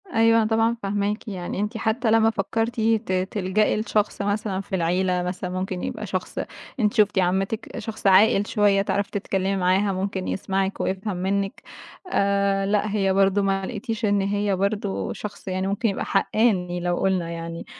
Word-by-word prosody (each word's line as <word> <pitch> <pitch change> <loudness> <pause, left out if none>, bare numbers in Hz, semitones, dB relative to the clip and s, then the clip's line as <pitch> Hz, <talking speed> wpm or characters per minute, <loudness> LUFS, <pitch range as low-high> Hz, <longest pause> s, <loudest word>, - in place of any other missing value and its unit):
أيوه، 225 0 +5
أنا 215 - +1
طبعًا 225 +1 +2
فاهماكِ، 205 +3 -1
يعني 185 -3 -4
أنتِ 210 +3 -2
حتى 225 +1 0
لمّا 225 0 +5
فكرتِ 225 +3 -2
ت 220 -3 +1 0.2
تلجأي 205 +2 +1
لشخص 210 -1 0
مثلًا 200 -1 -1
في 195 - -4
العيلة 180 +1 +1
مثلًا 180 0 -4
ممكن 185 0 -3
يبقى - - -4
شخص - - -4 0.4
أنتِ 210 -3 +2
شُفتِ 210 -3 +3
عمتِّك 195 +6 -1
شخص 220 -2 -4
عاقل 195 +1 +5
شوية، 205 -2 +3
تعرفي 200 0 -1
تتكلمي 195 -1 -1
معاها، 190 +2 +2
ممكن 190 0 -3
يسمعِك 195 0 -1
ويفهم 190 0 -2
منِّك 195 +5 -1 0.5
آآ، 200 0 +2
لأ 210 +1 +1
هي 195 -2 +1
برضه 195 +1 +3
ما 195 -1 0
لقيتيش 225 +1 -3
إن 200 -1 +2
هي 200 0 0
برضه 185 - -1
شخص 210 -1 -8
يعني 185 0 -1
ممكن 205 +4 0
يبقى 195 - -3
حقّاني 185 -6 +1
لو 175 0 -1
قُلنا 185 -3 0
يعني، 165 0 -6
200 Hz, 165 wpm, -24 LUFS, 190-215 Hz, 0.5 s, أيوه